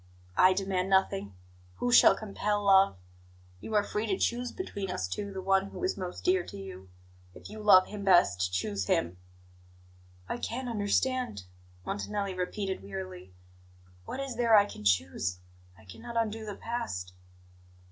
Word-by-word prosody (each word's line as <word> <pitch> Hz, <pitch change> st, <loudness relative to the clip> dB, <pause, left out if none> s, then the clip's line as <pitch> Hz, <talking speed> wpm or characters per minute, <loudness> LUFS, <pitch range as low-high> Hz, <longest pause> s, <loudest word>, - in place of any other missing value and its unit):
"I 185 Hz, +1 st, +6 dB
demand 190 Hz, -1 st, -1 dB
nothing. 100 Hz, -, +1 dB, 0.4 s
Who 245 Hz, -, -1 dB
shall 245 Hz, -, +7 dB
compel 205 Hz, 0 st, -2 dB
love? 195 Hz, -, +5 dB, 0.6 s
You 220 Hz, -, -5 dB
are 205 Hz, -, +4 dB
free 210 Hz, +2 st, -3 dB
to 195 Hz, -3 st, 0 dB
choose 245 Hz, +1 st, -1 dB
between 200 Hz, -, -5 dB
us 95 Hz, -, -2 dB
two 200 Hz, -, -4 dB
the 190 Hz, -1 st, -6 dB
one 195 Hz, +1 st, +2 dB
who 200 Hz, -, -8 dB
is 370 Hz, -, 0 dB
most 180 Hz, -2 st, -6 dB
dear 185 Hz, 0 st, +3 dB
to -, -, -10 dB
you. 95 Hz, -1 st, -9 dB, 0.5 s
If -, -, -11 dB
you 215 Hz, -, -8 dB
love 185 Hz, -3 st, +7 dB
Him 205 Hz, -1 st, -7 dB
best, 95 Hz, -, +4 dB
choose 95 Hz, +1 st, -2 dB
Him." 85 Hz, +1 st, 0 dB, 1.1 s
"I -, -, -3 dB
can't 250 Hz, +2 st, -4 dB
understand," 230 Hz, -, 0 dB, 0.4 s
Montanelli 200 Hz, -, -3 dB
repeated 190 Hz, +1 st, -3 dB
wearily. 95 Hz, -2 st, -8 dB, 0.7 s
"What -, -, -6 dB
is 270 Hz, -4 st, -4 dB
there 230 Hz, -3 st, +5 dB
I 205 Hz, -, +6 dB
can 155 Hz, -, -10 dB
choose? 90 Hz, -1 st, +1 dB, 0.4 s
I -, -, -18 dB
cannot 235 Hz, -, -8 dB
undo 220 Hz, -1 st, -1 dB
the 205 Hz, -, -5 dB
past." 90 Hz, -, -4 dB
195 Hz, 155 wpm, -29 LUFS, -, 1.1 s, shall